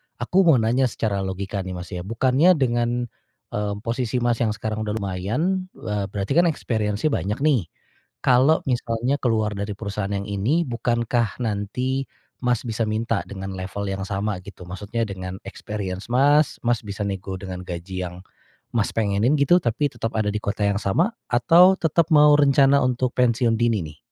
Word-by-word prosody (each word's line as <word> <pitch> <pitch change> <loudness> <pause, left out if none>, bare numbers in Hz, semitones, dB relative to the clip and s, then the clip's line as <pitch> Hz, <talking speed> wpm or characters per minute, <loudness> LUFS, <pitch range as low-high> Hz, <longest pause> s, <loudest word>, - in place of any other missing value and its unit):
aku 125 +10 0
mau 160 - +7
nanya 125 +3 +2
secara 105 -3 -2
logika 95 +1 -3
nih, 95 -1 -5
Mas, 90 +2 -8
ya 90 - -4
bukannya 130 - +3
dengan, 120 -2 0 0.5
eee, 105 -1 -2
posisi, 120 +1 -1
Mas, 120 -1 +1
yang 110 -3 +1
sekarang 110 0 -3
udah 105 - -2
lumayan, 125 - -1
eee, 105 -2 -3
berarti 100 +3 -4
kan 170 +4 +4
experience-nya 110 -3 -1
banyak 105 - -2
nih, 130 - +2 0.6
kalau 130 +5 +4
misalnya 120 +1 0
keluar 110 -3 +1
dari 100 +1 -3
perusahaan 100 -1 -4
yang 100 - -2
ini 110 +12 +1
bukankah 120 - -1
nanti, 125 +6 -2 0.4
Mas, 125 -2 +2
bisa 115 0 -1
minta 110 -3 -1
dengan 95 -1 -7
level 100 +2 -5
yang 95 0 -3
sama 100 +1 -2
gitu 100 -2 -11
maksudnya 105 +5 -3
dengan 95 -1 -6
experience 100 -2 -5
Mas 145 +3 +3
Mas 120 -1 0
bisa 100 0 -6
nego 95 -1 -4
dengan 90 -1 -6
gaji 90 +1 -5
yang, 90 0 -8 0.6
Mas, 110 -3 +1
pengenin 110 +4 +2
gitu 140 +5 +5
tapi 125 +5 +1
tetap 115 -1 -4
ada 110 -1 0
di 105 - -2
kota 105 +1 -2
yang 100 - +1
sama 170 - +1 0.2
atau 170 +11 +6
tetap 165 +1 +1
mau 150 -1 +7
rencana 140 -1 +5
untuk 125 0 0
pensiun 120 -2 +2
dini 115 -2 +1
nih? 75 - -13
110 Hz, 170 wpm, -23 LUFS, 100-130 Hz, 0.6 s, mau